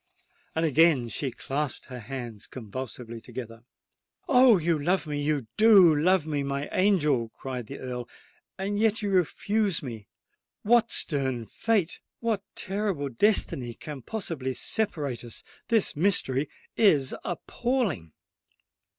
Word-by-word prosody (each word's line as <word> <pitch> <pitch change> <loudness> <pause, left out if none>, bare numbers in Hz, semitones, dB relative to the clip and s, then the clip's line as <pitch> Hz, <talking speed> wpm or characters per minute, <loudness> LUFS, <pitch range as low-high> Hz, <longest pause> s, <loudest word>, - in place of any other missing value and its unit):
And 160 +1 +1
again 150 -5 +4
she 135 +3 -1
clasped 135 +3 -4
her 125 -1 -8
hands 120 -3 -7
convulsively 120 0 -7
together. 115 -1 -9 0.6
"Oh! 250 - +6
you 165 -2 +1
love 180 +3 +1
me—you 145 -2 -1
do 200 -7 +7
love 175 +2 +3
me, 150 -2 -1
my 140 +1 -3
angel," 150 - +2
cried 125 -1 -6
the - - -7
Earl; 125 -2 -6 0.5
"and 200 +2 -2
yet 220 0 +2
you 205 - -1
refuse 195 +1 +1
me! 115 -6 -7 0.6
What 235 +2 +4
stern 130 -6 +1
fate—what 220 - -1
terrible 190 -8 -2
destiny 130 - +1
can 145 -1 -8
possibly 145 - -3
separate 150 - -2
us! 120 - -6 0.2
This 225 -3 +2
mystery 150 -5 +1 0.3
is 150 - +4
appalling!" 190 - -2
150 Hz, 120 wpm, -27 LUFS, 130-200 Hz, 0.6 s, do